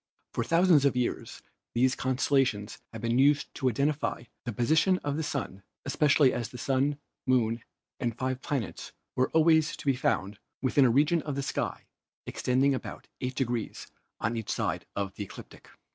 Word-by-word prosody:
For - - 0
thousands 165 -3 +4
of 140 -2 +3
years 125 -1 -2 0.3
these 125 +2 +3
constellations 130 -5 0
have 115 -1 -8
been 115 +2 +1
used 145 +2 +3
to 130 -2 +1
identify 140 +1 -1 0.2
the 120 - -2
position 155 - +3
of 145 -1 -1
the 160 - -1
Sun, 140 -10 -4 0.2
especially 140 -1 +4
as 120 -2 -3
the 125 - -9
Sun, 135 +3 +1 0.3
Moon 115 -2 +2 0.4
and 120 -3 -2
five 130 0 -2
planets 135 -10 -4 0.2
were 130 - +2
al 160 - +6
ways 160 -1 +3
to - - -10
be 135 -2 +3
found 105 -5 -1 0.2
within 135 +1 +3
a - - +5
region 150 +7 +3
of 145 -2 -4
the 140 - -2
sky - - -3 0.4
extending 130 +2 +1
about 130 - -6
8 130 0 -3
degrees 120 -4 -3 0.3
on 115 +1 -1
each 115 -2 -4
side - - -2
of 100 -1 -2
the 105 - -5
ecliptic. 100 - -12
130 Hz, 175 wpm, -29 LUFS, 120-145 Hz, 0.4 s, al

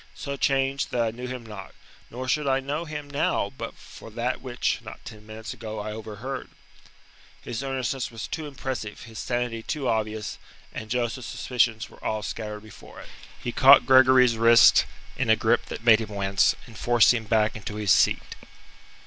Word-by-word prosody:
So 140 - -5
changed 135 0 0
that 120 - -1
I 115 - -1
knew 125 +3 -7
him 125 -2 -6
not, 105 -3 -10 0.3
nor 130 +2 -6
should 150 +2 0
I 135 0 +2
know 145 +5 -3
him 150 -2 -6
now 140 0 0
but - - -6
for - - -13
that - - -3
which, - - -2
not - - -11
ten 105 -2 -11
minutes 110 +2 -7
ago, 110 -3 -7
I 105 +1 -4
overheard." 110 +5 -6 0.9
His 120 - -4
earnestness 135 -1 -2
was 115 -1 -7
too 160 -2 -5
impressive, 130 -6 -6
his 115 -2 -10
sanity 120 -2 -2
too 140 +2 -3
obvious, 110 -1 -2 0.3
and 110 - -7
Joseph's 120 +1 -2
suspicions 120 -3 0
were - - -18
all 110 -1 -2
scattered 105 -1 -5
before 110 -2 -13
it. - - -12 0.3
He 120 - -4
caught 135 +3 +7
Gregory's 130 -2 +6
wrist 115 +1 +6 0.3
in - - -1
a - - +7
grip - - +1
that - - -7
made 115 -1 +7
him 110 - -5
wince, 100 -2 +2
and 115 - -14
forced 120 0 +4
him 115 -2 -3
back 110 0 +2
into 105 -1 -6
his 105 -3 0
seat. - - +2
120 Hz, 185 wpm, -25 LUFS, 110-130 Hz, 0.9 s, caught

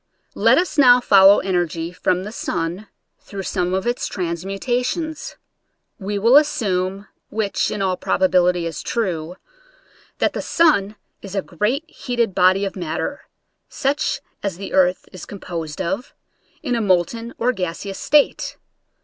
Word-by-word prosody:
Let - - +4
us 350 -3 0
now 250 -3 +7
follow 200 -4 +6
energy 175 -3 -1
from 180 0 0
the 210 - -6
sun 175 -1 -3 0.3
through 195 -1 -8
Borne 180 -1 0
of 190 - -2
its 240 +1 -1
transmutations. 240 - -3 0.6
We 200 +1 -3
will 230 +7 +6
assume 195 -9 0 0.2
(whi^h 210 -2 -1
in 200 - -2
all 185 -1 0
probability 180 -1 +2
is 165 -2 -4
true) 180 -7 -2 0.8
that - - +1
the - - -3
sun 220 - +2 0.3
is 195 0 -8
a 195 - 0
great 215 - -1
heated 240 -8 -2
body 185 +3 +3
of 195 - -5
matter, 175 - -4 0.4
such 285 +2 -1 0.2
as 195 -4 -3
the 195 - -7
earth 185 -1 +2
is 185 - -10
composed 170 -6 -6
of, 190 +7 -3 0.5
in 255 -5 -1
a 235 - 0
molten 210 +5 0
or 245 +2 +2
gaseous 190 0 -4
state. 295 0 +2
195 Hz, 140 wpm, -21 LUFS, 180-235 Hz, 0.8 s, now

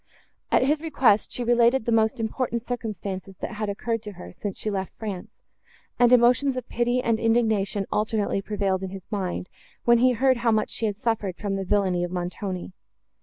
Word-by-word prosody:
At - - +4
his 295 +3 +2
request, 270 -10 +2
she 245 - -2
related 240 0 +3
the 235 - 0
most 225 +2 +2
important 235 +1 -2
circumstances, 200 -5 -5
that - - -5
had 215 -1 -2
occurred 225 +2 -2
to 210 -2 -8
her, 180 - -10
since 195 +2 -5
she 215 - -2
left 190 -2 -4
France, 210 -2 -5 0.7
and 245 0 +5
emotions 250 +2 +4
of 250 - -5
pity 240 +1 0
and 230 -1 +1
indignation 220 -4 +1
alternately 210 -2 0
prevailed 195 -2 -1
in 190 - -4
his 190 -1 -9
mind, 185 -3 -2 0.4
when 235 0 +6
he 255 +1 +4
heard 260 +2 +3
how 235 0 +1
much 220 -1 +1
she 225 - -1
had 205 - -2
suffered 210 -4 -2
from 200 -1 -2
the 195 - -2
villany 190 -2 +1
of 175 - -2
Montoni. 180 +1 -4
220 Hz, 190 wpm, -25 LUFS, 195-240 Hz, 0.7 s, when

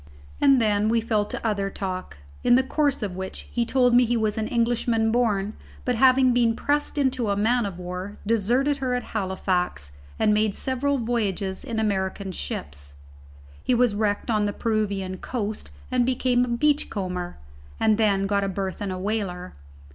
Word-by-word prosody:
And 275 -2 +6
then 210 -1 +2
we 230 +1 +3
fell 220 -2 0
to 210 - -6
other 200 -3 0
talk; 185 - -5 0.3
in 245 - +5
the 260 - +4
course 285 -2 0
of 190 -3 -3
which 190 0 -6
he 235 -1 0
told 250 -1 +3
me 245 +1 +7
he 240 0 +1
was 215 -2 0
an 220 -1 -2
Englishman 230 -1 +1
born, 215 -4 +1 0.3
but 250 - +1
having 255 +1 +5
been 235 -2 +3
pressed 290 +3 -1
into 255 -5 +1
a 200 - +1
man 225 +2 +2
o - - -2
war, 180 +2 -6
deserted 240 +7 +2
her 255 -2 -1
at 245 - -2
Halifax 185 - -1 0.3
and 210 - +3
made 215 -1 +1
several 275 +2 0
voyages 205 -5 -2
in 225 -2 -3
American 195 -2 -1
ships. 70 - -5 0.7
He 250 - +2
was 240 -2 +3
wrecked 205 +2 0
on 210 -1 +2
the 205 - -1
Peruvian 200 -5 -1
coast 215 -1 -4 0.2
and 250 -1 +3
became 250 0 +2
a 235 -1 -2
beachcomber, 195 -12 -1 0.4
and 220 0 +3
then 200 -3 +3
got 200 0 +1
a 195 - -1
berth 190 0 -4
in 200 - -2
a 185 - -3
whaler. 185 - -3
215 Hz, 175 wpm, -25 LUFS, 195-245 Hz, 0.7 s, me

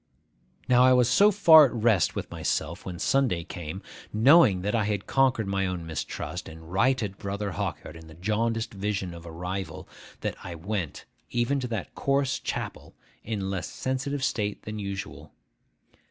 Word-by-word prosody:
Now 125 0 +5
I 130 0 +6
was 125 -2 +4
so 200 +11 +6
far 165 -7 +8
at 135 - -2
rest 110 -7 +2
with - - -5
myself, 85 +4 -2
when 90 -2 -5
Sunday 115 -4 +1
came, 85 +3 -7 0.3
knowing 115 - +5
that 105 - -1
I 110 -3 +2
had 105 -2 -2
conquered 130 -4 +2
my 95 0 0
own 90 -2 -4
mistrust, 80 -2 -5
and 80 +1 -12
righted 105 -2 +1
Brother 100 0 -3
Hawkyard 80 - -4
in 80 0 -12
the 80 - -13
jaundiced 110 +6 -1
vision 95 -2 -3
of 85 0 -10
a - - -8
rival, 90 -1 -5 0.3
that - - -3
I 90 -1 -6
went, 90 -1 -4 0.2
even 120 +4 0
to 125 - -3
that 115 -3 -4
coarse 140 -1 0
chapel, - - -5 0.3
in 110 -2 -3
a - - -2
less 95 -1 -3
sensitive 130 +1 -3
state 105 -5 -1
than 110 0 -6
usual. 100 -1 -6
105 Hz, 170 wpm, -27 LUFS, 90-125 Hz, 0.3 s, far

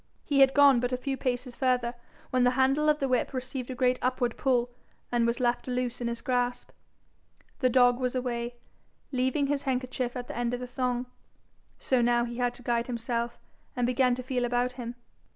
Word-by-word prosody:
He 285 -2 +1
had 270 0 +6
gone 280 -3 +7
but 245 +1 -1
a 250 - 0
few 270 +2 -3
paces 250 -1 -3
further 250 -3 +1 0.4
when 255 -1 +3
the 250 - +5
handle 270 +3 +3
of 300 - +4
the 275 - -1
whip 255 +1 0
received 255 0 -4
a 255 - -4
great 250 0 +2
upward 250 -2 0
pull 245 -2 +1 0.4
and 240 -1 +2
was 235 +2 0
left 240 0 0
loose 250 -1 -2
in 240 - -1
his 235 0 -3
grasp: 245 -1 -1 0.9
the 255 - +3
dog 245 0 +4
was 255 0 -1
away, 240 -1 -2 0.6
leaving 260 +2 +1
his 280 0 0
handkerchief 255 -2 -2
at 245 - -5
the - - -7
end 240 0 -1
of - - -6
the 250 - -5
thong. 250 0 -2 0.7
So 255 -2 +1
now 240 0 +3
he 235 0 -6
had 245 -1 0
to 245 - -12
guide 235 0 0
himself, 235 0 -2 0.4
and 245 -1 +1
began 250 0 +2
to 255 - -6
feel 250 -1 -1
about 245 +1 +1
him. 245 -1 -7
250 Hz, 205 wpm, -28 LUFS, 240-260 Hz, 0.9 s, gone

